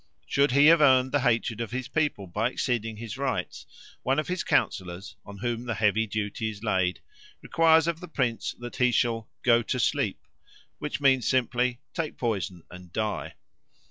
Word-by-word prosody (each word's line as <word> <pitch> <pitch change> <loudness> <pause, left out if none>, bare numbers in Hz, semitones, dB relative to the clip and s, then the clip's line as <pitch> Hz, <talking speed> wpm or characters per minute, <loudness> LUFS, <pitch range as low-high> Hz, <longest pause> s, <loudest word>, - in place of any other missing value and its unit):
Should 140 - +2
he 140 +2 +6
have 165 0 +7
earned 130 -2 +5
the 145 - +2
hatred 115 -3 0
of 115 - -3
his 130 +1 -4
people 145 -8 -1
by 105 +6 -1
exceeding 115 -4 -2
his 115 +2 -7
rights, 140 -2 -3 0.3
one 135 +2 0
of 155 - -1
his 180 0 -1
councillors, 95 +2 -1
on 100 0 -11
whom 120 +3 -3
the 115 - -1
heavy 110 +2 +2
duty 110 +2 -3
is 105 0 -9
laid, 95 -4 0 0.4
requires 160 -1 +4
of 170 -1 -1
the 180 - -9
prince 125 -8 -2
that 120 0 -8
he 125 -1 +3
shall 115 -2 0
'go 120 -1 +5
to 125 +2 -2
sleep,' - - 0 0.5
which 150 -1 -4
means 130 -5 +3
simply 125 0 +1
'take 165 -2 -3
poison 100 -7 -2
and 90 -1 -12
die.' 110 +3 -3
120 Hz, 175 wpm, -27 LUFS, 110-135 Hz, 0.5 s, have